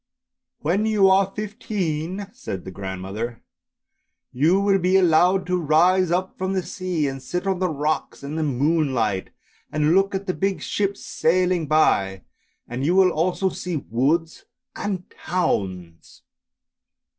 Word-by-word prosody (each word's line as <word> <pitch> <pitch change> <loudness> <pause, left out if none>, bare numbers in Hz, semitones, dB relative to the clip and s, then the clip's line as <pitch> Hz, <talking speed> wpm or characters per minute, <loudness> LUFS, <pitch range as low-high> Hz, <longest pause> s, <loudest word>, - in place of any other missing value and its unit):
" - - -64
When 190 +8 +1
you 205 -3 +4
are 195 0 +3
fifteen," 200 -4 -3
said 95 -3 -6
the 95 - -6
grandmother, 95 +5 -5 0.4
" - - -54
you 175 +5 +5
will 200 -1 +3
be 180 +1 +2
allowed 180 +1 +4
to 180 0 0
rise 175 +4 +3
up 185 +3 -1
from 190 +1 -1
the 190 -1 0
sea 180 -6 -2
and 135 0 -5
sit 180 +8 -4
on 190 -2 0
the 185 -1 +1
rocks 150 -1 -2
in 140 +2 -5
the 160 - -2
moonlight, 135 - 0 0.4
and 155 +1 +2
look 195 +1 +2
at 190 +1 -3
the 185 - -1
big 195 0 -1
ships 200 -1 -2
sailing 180 -1 +1
by, 100 -11 +2 0.4
and 120 +2 -4
you 170 +5 +2
will 190 -1 +5
also 180 +4 0
see 180 -3 -4
woods 160 +8 0 0.3
and 190 -3 -4
towns." 95 - -3
175 Hz, 150 wpm, -23 LUFS, 140-190 Hz, 0.4 s, you